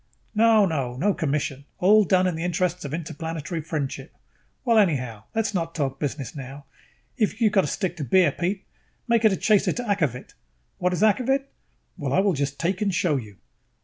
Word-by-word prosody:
"No, 220 Hz, -1 st, +5 dB
no, 135 Hz, -8 st, -2 dB
no 195 Hz, +10 st, +1 dB
commission, 140 Hz, -3 st, -2 dB
all 210 Hz, +4 st, +5 dB
done 185 Hz, 0 st, +3 dB
in 180 Hz, -, +1 dB
the 165 Hz, -, -4 dB
interest 180 Hz, 0 st, -1 dB
of 140 Hz, -, -5 dB
interplanetary 165 Hz, +1 st, -4 dB
friendship... 150 Hz, -3 st, -4 dB, 0.5 s
well, 230 Hz, -3 st, +5 dB
anyhow, 125 Hz, -, 0 dB
let's 225 Hz, -1 st, 0 dB
not 165 Hz, -3 st, -2 dB
talk 135 Hz, -4 st, -2 dB
business 145 Hz, -2 st, -4 dB
now. 140 Hz, +1 st, -8 dB, 0.5 s
If 220 Hz, -2 st, 0 dB
you 225 Hz, -3 st, +4 dB
have -, -, -13 dB
got 195 Hz, -, +5 dB
to 150 Hz, -, -3 dB
stick 180 Hz, +1 st, -2 dB
to 155 Hz, -, -3 dB
beer, 175 Hz, +7 st, +4 dB
Pete, 190 Hz, +3 st, -3 dB, 0.4 s
make 235 Hz, -1 st, +3 dB
it 215 Hz, -, +6 dB
a 190 Hz, -, 0 dB
chaser 210 Hz, -3 st, +3 dB
to 245 Hz, -, -4 dB
akvavit. 160 Hz, -, -1 dB, 0.5 s
What 180 Hz, 0 st, +1 dB
is 180 Hz, -, 0 dB
akvavit? 255 Hz, +5 st, +3 dB, 0.5 s
Well, -, -, -3 dB
I -, -, +4 dB
will 195 Hz, -1 st, +3 dB
just 140 Hz, -1 st, -2 dB
take 185 Hz, +4 st, -1 dB
and 205 Hz, -2 st, +1 dB
show 175 Hz, -4 st, +1 dB
you." 105 Hz, -7 st, -6 dB
175 Hz, 195 wpm, -24 LUFS, 145-205 Hz, 0.5 s, it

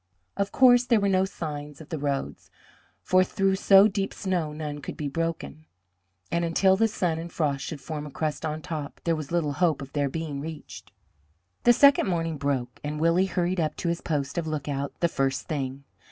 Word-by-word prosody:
Of 200 Hz, 0 st, -1 dB
course 245 Hz, -2 st, +6 dB
there 235 Hz, -3 st, +3 dB
were 200 Hz, -, +1 dB
no 190 Hz, 0 st, +3 dB
signs 150 Hz, -6 st, -6 dB
of 160 Hz, -, -12 dB
the 160 Hz, -, -3 dB
roads, 140 Hz, -1 st, -3 dB, 0.5 s
for 185 Hz, 0 st, +4 dB
through 195 Hz, +1 st, +1 dB
so 195 Hz, +1 st, +7 dB
deep 195 Hz, -1 st, -2 dB
snow 180 Hz, -5 st, -1 dB
none 150 Hz, -1 st, -5 dB
could -, -, -7 dB
be 150 Hz, -, -3 dB
broken, 160 Hz, 0 st, -4 dB, 0.7 s
and 170 Hz, 0 st, +1 dB
until 190 Hz, +3 st, +3 dB
the 225 Hz, +3 st, +3 dB
sun 175 Hz, -6 st, -1 dB
and 170 Hz, +1 st, -7 dB
frost 140 Hz, -4 st, -1 dB
should 155 Hz, -, -5 dB
form 150 Hz, +2 st, -6 dB
a -, -, -10 dB
crust 155 Hz, +2 st, -3 dB
on 155 Hz, 0 st, -3 dB
top 155 Hz, -5 st, -5 dB
there 165 Hz, -1 st, +1 dB
was 155 Hz, -1 st, -6 dB
little 165 Hz, -4 st, 0 dB
hope 165 Hz, -3 st, +1 dB
of 135 Hz, 0 st, -9 dB
their 145 Hz, -2 st, 0 dB
being 150 Hz, -2 st, -4 dB
reached. 155 Hz, 0 st, -9 dB, 0.7 s
The 240 Hz, -, +8 dB
second 280 Hz, -1 st, +5 dB
morning 165 Hz, -3 st, -1 dB
broke, 135 Hz, -3 st, -2 dB
and 150 Hz, +1 st, -3 dB
Willie 170 Hz, +4 st, +3 dB
hurried 180 Hz, 0 st, -1 dB
up 155 Hz, -2 st, 0 dB
to 170 Hz, -, -2 dB
his 170 Hz, 0 st, -2 dB
post 145 Hz, -1 st, -2 dB
of 165 Hz, -, -4 dB
lookout 145 Hz, -2 st, -3 dB
the 170 Hz, -, +4 dB
first 135 Hz, -4 st, -1 dB
thing. 135 Hz, -2 st, -3 dB
160 Hz, 200 wpm, -26 LUFS, 145-180 Hz, 0.7 s, The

